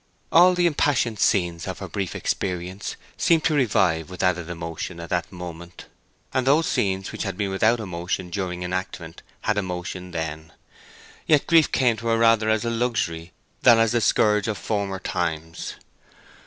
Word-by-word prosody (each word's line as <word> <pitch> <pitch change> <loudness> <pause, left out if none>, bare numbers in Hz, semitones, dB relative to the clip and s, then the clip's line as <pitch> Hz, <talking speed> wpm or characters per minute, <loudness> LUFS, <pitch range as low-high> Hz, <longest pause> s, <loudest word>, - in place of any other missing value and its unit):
All 180 +2 +7
the 175 0 +2
impassioned 140 - +1
scenes 85 -5 +1
of - - -4
her - - -6
brief 100 -3 -4
experience 90 +1 -3 0.2
seemed 165 -4 +3
to 160 - +2
revive 90 - +2
with 90 - -5
added 90 -2 0
emotion 85 0 -5
at 85 - -8
that 90 -2 -1
moment, 85 -1 -9 0.5
and 130 0 0
those 155 +4 +4
scenes 95 - -1
which - - -6
had - - -3
been 100 -2 -1
without 110 +5 +2
emotion 90 -2 -4
during 90 -2 -3
enactment 90 -2 -5 0.2
had 105 -1 +1
emotion 90 -1 -5
then. 80 -2 -5 0.7
Yet 150 -3 +4
grief 165 -3 +4
came 120 -4 +2
to 115 - -5
her 115 0 +3
rather 115 -1 +4
as 110 +1 +1
a 115 - 0
luxury 100 -9 -1 0.3
than 120 -2 +7
as 115 0 +3
the 120 -1 +1
scourge 105 0 +3
of 110 -2 -2
former 100 0 -2
times. 80 -3 -3
95 Hz, 170 wpm, -24 LUFS, 85-115 Hz, 0.7 s, All